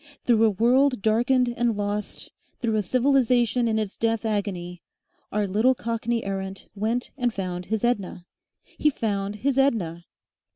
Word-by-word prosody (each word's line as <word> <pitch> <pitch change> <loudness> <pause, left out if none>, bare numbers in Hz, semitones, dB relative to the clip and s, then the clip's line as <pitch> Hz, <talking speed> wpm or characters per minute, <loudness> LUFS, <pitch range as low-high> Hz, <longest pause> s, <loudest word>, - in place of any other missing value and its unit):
Through 230 -2 +4
a - - +5
world 250 +3 +2
darkened 240 +3 +2
and 235 -3 +1
lost, 205 0 -4 0.3
through 230 -3 0
a 215 - +2
civilisation 245 +1 +2
in 220 -1 +1
its 215 -3 -3
death 225 0 0
agony, 185 -5 -3 0.5
our 210 0 0
little 220 +7 +2
Cockney 230 0 -2
errant 195 0 -5
went 225 +4 -2
and 245 -1 +1
found 180 -3 -4
his 220 +1 -2
Edna! 200 -7 -1 0.4
He 300 - 0
found 205 -6 -2
his 270 +5 0
Edna! 175 -11 0
220 Hz, 150 wpm, -25 LUFS, 200-240 Hz, 0.5 s, a